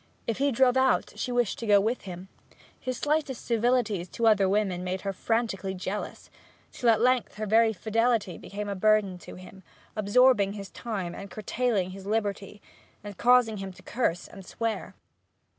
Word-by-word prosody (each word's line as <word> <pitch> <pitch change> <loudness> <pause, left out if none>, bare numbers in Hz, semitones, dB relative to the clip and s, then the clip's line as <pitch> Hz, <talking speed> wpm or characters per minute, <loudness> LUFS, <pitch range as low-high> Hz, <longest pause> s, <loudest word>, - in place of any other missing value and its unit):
If 230 +1 -2
he 280 0 +2
drove 255 +1 +3
out, 260 -1 +2
she 250 - -3
wished 245 -3 0
to 230 - -5
go 205 -1 +6
with 225 +5 -1
him; 180 0 -8 0.5
his 255 -1 -4
slightest 295 -4 -1
civilities 230 -6 +1
to 235 - -2
other 205 -4 +4
women 195 -3 0
made 185 +1 -3
her 195 -1 -3
frantically 200 -2 -1
jealous; 190 +3 -5 0.4
till 240 - +1
at 220 -2 +4
length 250 +1 +2
her 215 +1 -4
very 225 +2 +4
fidelity 220 -2 0
became 205 +1 -6
a 200 - -2
burden 200 -1 +2
to - - -11
him, 185 +1 -13 0.3
absorbing 210 -1 +4
his 200 -2 -8
time, 195 -7 -4
and 195 - -8
curtailing 215 -2 -1
his 195 +1 -10
liberty, 205 -1 -2 0.4
and 205 -2 -9
causing 245 -3 +4
him 195 -1 -6
to - - -17
curse 210 -8 -1
and 195 - -12
swear. 225 +4 -4
215 Hz, 175 wpm, -27 LUFS, 195-235 Hz, 0.5 s, go